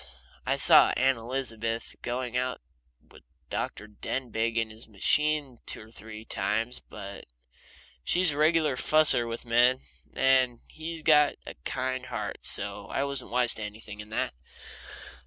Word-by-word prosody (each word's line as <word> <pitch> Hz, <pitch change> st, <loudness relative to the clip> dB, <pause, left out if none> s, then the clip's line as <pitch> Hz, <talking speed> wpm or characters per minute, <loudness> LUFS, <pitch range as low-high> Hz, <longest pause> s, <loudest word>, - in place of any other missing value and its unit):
I -, -, +2 dB
saw -, -, +8 dB
Aunt 135 Hz, -2 st, +2 dB
Elizabeth 115 Hz, -2 st, -4 dB
going 125 Hz, 0 st, -4 dB
out 125 Hz, 0 st, -1 dB, 0.5 s
with -, -, -16 dB, 0.3 s
Dr. 105 Hz, -, -3 dB
Denbigh 115 Hz, +1 st, -3 dB
in 115 Hz, -1 st, 0 dB
his 110 Hz, +2 st, -10 dB
machine 140 Hz, +5 st, 0 dB
two -, -, -5 dB
or -, -, -21 dB
three 110 Hz, -1 st, -10 dB
times, 110 Hz, +6 st, -2 dB
but 100 Hz, -2 st, -10 dB, 0.8 s
she's 180 Hz, -, +3 dB
a 140 Hz, -, -6 dB
regular 155 Hz, -2 st, +3 dB
fusser 150 Hz, -4 st, +4 dB
with 115 Hz, +1 st, -6 dB
men, 120 Hz, +2 st, +3 dB, 0.3 s
and 130 Hz, -2 st, +3 dB
he's 160 Hz, 0 st, -7 dB
got 150 Hz, -2 st, +5 dB
a -, -, -7 dB
kind 130 Hz, 0 st, -3 dB
heart, 115 Hz, -4 st, -4 dB
so -, -, 0 dB
I 135 Hz, -, -1 dB
wasn't 140 Hz, 0 st, -2 dB
wise 120 Hz, 0 st, +3 dB
to -, -, -6 dB
anything 105 Hz, 0 st, -9 dB
in 105 Hz, 0 st, -9 dB
that. 110 Hz, -, -2 dB
125 Hz, 145 wpm, -28 LUFS, 110-135 Hz, 0.8 s, saw